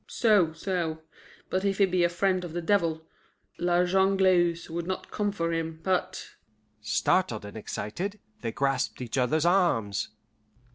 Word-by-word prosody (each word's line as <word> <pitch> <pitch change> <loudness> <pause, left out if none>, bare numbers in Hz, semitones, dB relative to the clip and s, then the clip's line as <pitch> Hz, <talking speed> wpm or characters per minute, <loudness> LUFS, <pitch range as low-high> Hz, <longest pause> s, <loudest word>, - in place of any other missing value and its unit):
"So, 205 -8 +3
so. 165 -2 -3 0.5
But 185 +1 0
if 195 -1 0
he 200 - +5
be 180 -1 +1
a 175 - +4
friend 185 +1 0
of 170 -3 -7
the 175 - -2
devil, 165 -4 +1 0.6
La 175 0 +2
Jongleuse 185 -2 +3
would 170 +1 -4
not 185 - -4
come 205 -1 0
for 165 -4 -2
him, 165 -1 -3
but 185 -1 -1 0.3
" 105 0 -42
Startled 110 - +1
and 100 - -9
excited, 170 - -4 0.2
they 115 - -2
grasped 135 +1 -1
each 125 +1 -2
other's 155 +6 +1
arms. 170 - +2
175 Hz, 155 wpm, -28 LUFS, 155-190 Hz, 0.6 s, he